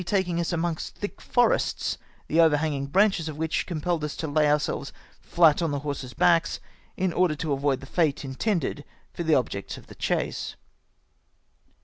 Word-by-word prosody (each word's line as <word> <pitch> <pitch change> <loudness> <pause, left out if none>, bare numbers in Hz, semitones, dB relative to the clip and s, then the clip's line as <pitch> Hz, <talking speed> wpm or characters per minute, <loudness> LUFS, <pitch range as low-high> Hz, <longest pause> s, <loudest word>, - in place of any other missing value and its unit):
7i - - -8
taking 190 -4 +1
iis 170 - -1
amongst 170 -1 -2
thick 205 - -6
forests, 245 -1 +1 0.3
tlie 160 - +1
overhanging 150 -3 +3
branches 190 0 +2
of 150 - -7
which 160 -2 -1
compelled 170 -1 -1
us 150 - -3
to 160 - -4
lay 150 +1 +2
om^selves 150 -1 0 0.3
flat 165 -2 +4
on 165 - +1
the 145 - -1
horses' 140 -4 -5
backs, 165 -1 +3 0.4
in 185 -2 0
order 175 -3 +2
to 150 0 -2
avoid 135 -1 0
the - - -9
fate 150 -2 0
intended 145 +2 -1 0.3
for - - -5
the 160 -2 +3
objects 105 -6 -2
of - - -13
the - - -13
chase. - - -2
160 Hz, 170 wpm, -26 LUFS, 145-175 Hz, 0.4 s, flat